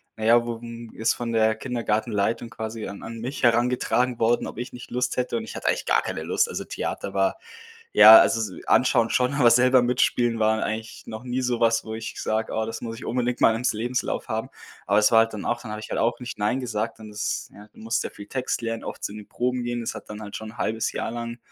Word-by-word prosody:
na 110 - -4
ja, 120 +1 +5
wu 115 -1 -3
m 115 -1 -8
ist 110 +1 +1
von 120 -1 -4
der 110 -1 +3
Kindergartenleitung 115 -2 -1
quasi 110 -2 -6
an 100 - -8
an 115 0 -7
mich 125 +3 -5
herangetragen 125 +1 +2
worden, 115 +1 +2
ob - - -9
ich 125 +1 -6
nicht 125 0 -10
Lust 125 0 -1
hätte 125 - 0
und 225 - -4
ich - - -9
hatte - - -4
eigentlich - - +1
gar - - +3
keine - - -4
Lust. 470 - +1
Also - - -4
Theater - - -4
war - - +1 0.6
ja, 110 +1 +11
also 115 - +3
s - - -11
anschauen 120 -3 +3
schon, 125 +2 +1
aber 120 -5 +5
selber 125 +2 +5
mitspielen 120 -1 +1
waren 110 0 +2
eigentlich 110 +1 -4
noch 110 +1 -7
nie 125 +1 -2
sowas, 115 -2 +2
wo 110 0 -6
ich 110 0 -6
sage: 110 +1 -1
„Oh, 110 0 -1
das 115 0 -6
muss 115 -1 -5
ich - - -9
unbedingt 125 0 -1
mal 115 - +5
ims 120 +2 0
Lebenslauf 120 +4 -2
haben.“ - - -3 0.4
Aber 100 +2 +3
es 105 - +5
war 115 - +8
halt 115 0 +1
dann 105 - -6
auch 120 +1 -1
dann 110 - -8
habe 105 - -5
ich 110 - -9
halt - - -2
auch 120 +1 0
nicht 125 - -6
nein 105 +6 0
gesagt 115 -2 -3
und 110 - -9
das 105 0 -3
ja, 105 +1 -13
du - - -21
musst 115 +1 -1
ja - - -4
viel 100 - -11
Text 130 0 -2
lernen, 115 0 -3
oft - - -7
zu - - -3
den 105 -1 -9
Proben 125 0 -1
gehen. 120 0 -2
Das 115 - -4
hat - - -10
dann 105 0 -7
halt 100 -1 -7
schon 110 0 -9
1/2 110 0 -1
Jahr - - -3
lang, 120 0 -5
115 Hz, 250 wpm, -25 LUFS, 110-125 Hz, 0.6 s, ja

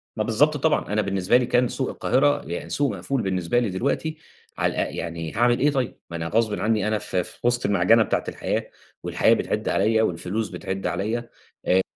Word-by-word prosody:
ما - - 0
بالضبط - - +2
طبعًا. 105 - 0
أنا 105 - +2
بالنسبة 100 +2 +2
لي 125 - +1
كان 125 0 +2
سوق 130 - -2
القاهرة 145 +3 +2
يعني 85 - -5
سوق 140 -4 +1
مقفول 125 +8 -2
بالنسبة 95 +4 0
لي 120 - 0
دلوقتي 140 - -2 0.4
على - - +1
أ - - -8
يعني 85 -1 -5
هاعمل 120 +2 +3
إيه 145 +2 +3
طيب؟ 130 -4 -2
ما 85 - -5
أنا 80 0 -3
غصبٍ 110 +1 +1
عنّي 110 -1 +1
أنا 110 0 +1
في 90 -1 -1
في - - -8
وِسط 120 0 +1
المعجة 105 +3 +4
بتاعة - - -1
الحياة - - -3 0.3
والحياة - - +3
بتعِد - - -1
عليّا 110 +3 +2
والفلوس 90 +5 -2
بتعِد 95 0 -4
عليّا 115 +4 -2 0.4
آآ 95 +1 +4
110 Hz, 195 wpm, -24 LUFS, 95-120 Hz, 0.4 s, المعجة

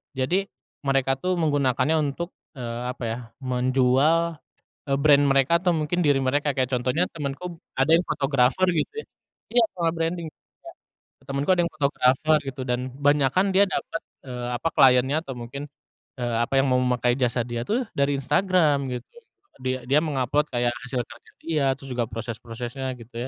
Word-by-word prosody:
jadi, 175 +10 0 0.4
mereka 135 -1 +2
tuh 185 +4 0
menggunakannya 145 -1 +1
untuk, 155 +4 -2 0.2
eee, 120 -2 -5
apa 125 - -9
ya 115 - -3 0.3
menjual, 130 +6 +2 0.4
eee, 135 -2 0
brand 145 -1 +5
mereka 135 +2 +3
atau 180 - +3
mungkin 175 +4 0
diri 145 -3 +3
mereka 145 +3 +1
kayak 130 -2 0
contohnya 130 +9 +1
temanku 160 +4 -5 0.2
ada 135 +4 +3
yang 170 - +2
fotografer 140 +4 +1
gitu 175 - 0
ya, - - -8 0.5
iya 240 - +7
soal 170 -2 0
branding 165 0 -2 0.9
Kak, 135 - -27
temanku 140 +4 -1
ada 180 - +3
yang - - -6
fotografer 140 +1 +3
gitu 130 0 -5
dan 125 0 -1 0.3
banyakan 150 +7 +3
dia 200 +1 +6
dapat, 215 +2 -3 0.2
eee, 125 -2 -5
apa 165 - -1
kliennya 130 0 +5
atau 135 - -7
mungkin, 125 +5 -7 0.5
eee, 120 -2 -2
apa 135 - -5
yang 135 - +3
mau 125 - +3
memakai 125 -1 +1
jasa 125 -1 +1
dia 120 -1 -4
tuh 240 +5 +1
dari 140 0 +2
Instagram 165 +1 +2
gitu 125 - -5 0.6
dia 130 0 -2
dia 145 +3 +4
mengupload 145 -1 0
kayak 120 -1 0
hasil 125 -1 -2
karya 120 0 -16
dia 155 -3 0
terus 135 -1 -11
juga 120 -1 0
proses-prosesnya 120 +3 -5
gitu 115 0 -15
135 Hz, 165 wpm, -24 LUFS, 125-160 Hz, 0.9 s, iya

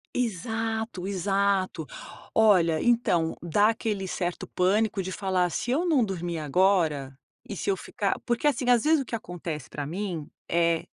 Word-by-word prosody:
Exato, 225 -2 -2
exato. 195 -4 0 0.5
Olha 180 -7 +5
então 180 -9 +2
dá 205 +6 +3
aquele 215 -4 -2
certo 175 -1 -3
pânico 200 +2 +1
de 185 0 -5
falar: 185 -3 0
"Se 240 - -2
eu 320 +7 +1
não 275 -9 +3
dormir 175 -3 -3
agora 155 -4 +1 0.3
e - - -4
se - - -5
eu - - +1
ficar" - - -2
Porque 240 +4 -1
assim 255 -3 +2
às 245 -2 +5
vezes 310 -1 +4
o 265 - -5
que 230 - -4
acontece 170 - -6
pra 145 -1 -4
mim, 175 -3 -4 0.2
eh, 170 -1 +1
190 Hz, 160 wpm, -27 LUFS, 170-225 Hz, 0.5 s, Olha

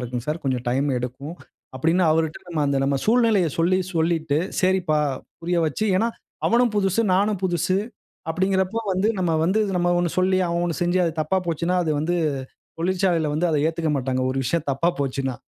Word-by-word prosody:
இருக்குங் 125 0 -4
சார் 155 +3 -3
கொஞ்சம் 130 -2 -1
டைம் 135 +4 +1
எடுக்கும்" 130 +6 -6 0.4
அப்படின்னு 165 +7 +2
அவர்ட்ட 160 0 0
நம்ம 165 -3 -2
அந்த 140 0 +1
நம்ம 140 0 +1
சூழ்நிலைய 220 -6 +3
சொல்லி 180 +3 +3 0.2
சொல்லிட்டு, 160 -2 +1 0.2
சரிப்பா 185 -5 +2 0.4
புரிய 175 +1 -1
வச்சு 155 +8 -2
ஏன்னா 225 +5 +2 0.4
அவனும் 240 -1 +3
புதுசு, 195 +1 +2
நானும் 200 0 +1
புதுசு 180 +1 +1 0.5
அப்படிங்கறப்ப 190 +4 0
வந்து 190 +3 +1
நம்ம 175 -3 +1
வந்து 190 +6 +2 0.2
நம்ம 175 0 +1
ஒண்ணு 175 -1 0
சொல்லி, 185 0 +3
அவன் 170 0 -1
ஒண்ணு 170 -4 -3
செஞ்சு 175 +1 +1
அது 165 - 0
தப்பா 155 +5 0
போச்சுன்னா, 170 +2 -1
அது 160 - -1
வந்து 170 +3 0 0.6
தொழிற்சாலைல 175 -1 +1
வந்து 165 +4 +1
அத 155 - +1
ஏத்துக்கமாட்டாங்க. 145 -6 -1
ஒரு 135 - -2
விஷயம் 160 +5 -1 0.3
போச்சுன்னா! 135 -1 -2
170 Hz, 165 wpm, -23 LUFS, 150-185 Hz, 0.6 s, சூழ்நிலைய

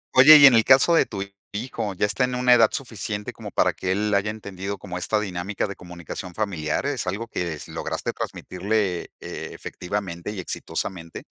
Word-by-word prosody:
Oye, 145 +4 +10
y 145 - +9
en 135 - +9
el 115 -1 +5
caso 135 +7 +5
de 165 - +4
tu 100 -2 -4 0.3
hijo, 110 -2 -4
¿ya 95 - +1
está 105 +5 0
en 125 0 -3
una 125 0 +4
edad 115 -3 +6
suficiente, 110 -6 -4
como - - -8
para - - +2
que 95 - -3
él 105 +2 0
haya 100 +1 +2
entendido 100 -2 -6
como 90 -3 -6
esta 105 +4 0
dinámica 95 -1 -3
de 100 - -6
comunicación 90 0 -8
familiar? 90 - -2
¿Es 140 -8 -2
algo 100 +5 -2
que 90 -6 -3
s 75 -1 -9
lograste - - -3
transmitirle, 95 -1 -2
eh, - - -7
efectivamente 90 -2 -5
y 105 -2 -5
exitosamente? 85 -1 -5
105 Hz, 190 wpm, -24 LUFS, 90-115 Hz, 0.3 s, Oye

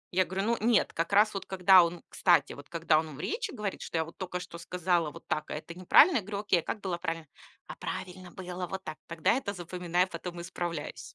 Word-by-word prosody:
Я 185 0 +4
говорю: 190 +2 -2
"Ну 235 0 +2
нет". 230 0 +3
Как 165 +3 -2
раз 210 +2 +5
вот 195 - -5
когда 185 -1 +7
он 170 0 -3
кстати, 175 -2 +3
вот 145 0 -12
когда 165 -2 +3
он 155 -2 -5
в - - -12
речи 450 - -2
говорит, 210 - -4
что - - -3
я 160 - +1
вот 165 - -13
только 180 -1 -4
что 170 -1 -9
сказала 175 -1 0
вот - - -13
так, 155 0 -2
а - - -3
это 160 +2 -7
неправильно, 220 - +6
я - - 0
говорю: 200 +1 -4
"Окей, 200 -4 +3
а - - -6
как 215 - -4
было 180 -3 -3
правильно?" 165 -2 -3 0.4
"А - - -7
правильно 185 0 -6
было 180 0 -6
вот 190 +2 -5
так". 155 - -7
Тогда 165 -2 +1
это 230 -5 -2
запоминаю, 180 0 -1
потом 175 0 -7
исправлюсь. 170 -3 -4
180 Hz, 235 wpm, -30 LUFS, 170-190 Hz, 0.4 s, когда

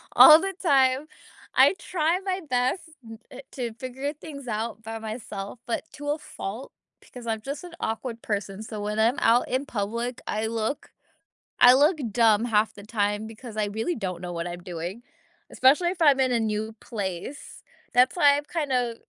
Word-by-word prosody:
all 310 0 +10
the 385 +1 -3
time. 270 -3 +3 0.5
I - - +6
try 345 0 0
my 380 -1 -2
best 250 +6 +1 0.2
n 225 -1 -10
eh, 265 - -9
to 240 -4 -4
figure 260 +4 -5
things 285 -3 -10
out 220 0 -3
by 225 0 -6
myself, 215 -1 -6
but 235 - -2
to 290 0 -6
a 295 - +1
fault, 255 -5 -7 0.3
because 250 -2 -12
I'm 220 -1 -2
just 280 +6 -6
an 350 -1 -10
awkward 230 +1 -4
person, 200 -1 -3
so 215 -1 -6
when 210 +1 -2
I'm 230 +4 +3
out 235 +2 +3
in 260 +3 -1
public, 235 +3 -3
I 215 +1 -1
look 225 +4 -3 0.7
I 245 +1 +9
look 300 +6 +4
dumb 225 0 +4
half 215 -2 +2
the 205 - -12
time, 205 0 -1
because 225 0 -10
I 215 - +1
really 220 +12 -2
don't 185 -6 -4
know 180 -1 -5
what 170 0 -3
I'm 175 0 -6
doing, 175 +6 -6 0.5
especially 290 +7 +4
if 350 -1 -5
I'm 285 -4 +5
in 260 -1 +2
a 235 - +2
new 220 0 -2
place. 200 - -6 0.3
That's 250 +5 +4
why 285 -4 +5
I've 290 - -6
kinda 255 -8 -1
235 Hz, 180 wpm, -26 LUFS, 215-280 Hz, 0.7 s, all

